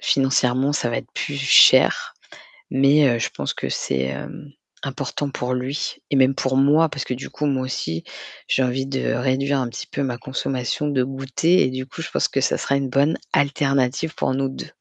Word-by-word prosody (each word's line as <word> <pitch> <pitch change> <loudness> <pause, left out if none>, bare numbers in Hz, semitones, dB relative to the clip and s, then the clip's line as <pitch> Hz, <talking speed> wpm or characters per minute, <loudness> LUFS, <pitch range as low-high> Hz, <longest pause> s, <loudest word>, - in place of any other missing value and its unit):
financièrement, 135 0 +2
ça 120 -5 -1
va 115 - -1
être - - -10
plus 145 - -3
cher. 135 -2 +5 0.6
Mais, 140 +2 +4
heu, 120 -2 +1
je - - -1
pense - - -4
que - - -4
c'est, 65 - -2
hem, 65 - -7 0.3
important 140 +1 -3
pour 125 -1 -3
lui 130 +3 -3 0.2
et - - 0
même 130 0 +4
pour 130 0 0
moi, 150 +4 +4
parce 140 - -5
que 125 - -3
du 125 - -7
coup, 150 - -4
moi 135 -2 0
aussi, 80 -10 -3 0.5
j'ai 130 - +2
envie 130 +2 -1
de 135 -1 -1
réduire 135 +3 0
un 125 - -2
petit - - -7
peu - - -4
ma 125 -3 -2
consommation 130 +3 -3
de 130 -3 +1
goûters 135 +7 +1
et 130 - +2
du 130 0 -5
coup, 150 - -9
je 160 - -5
pense - - +1
que 135 - -1
ça - - +1
sera 140 - -1
une 135 -1 -2
bonne 140 +5 +2 0.2
alternative 140 +2 +1
pour - - -1
nous 135 0 -1
2. 135 - -8
135 Hz, 205 wpm, -22 LUFS, 130-140 Hz, 0.6 s, cher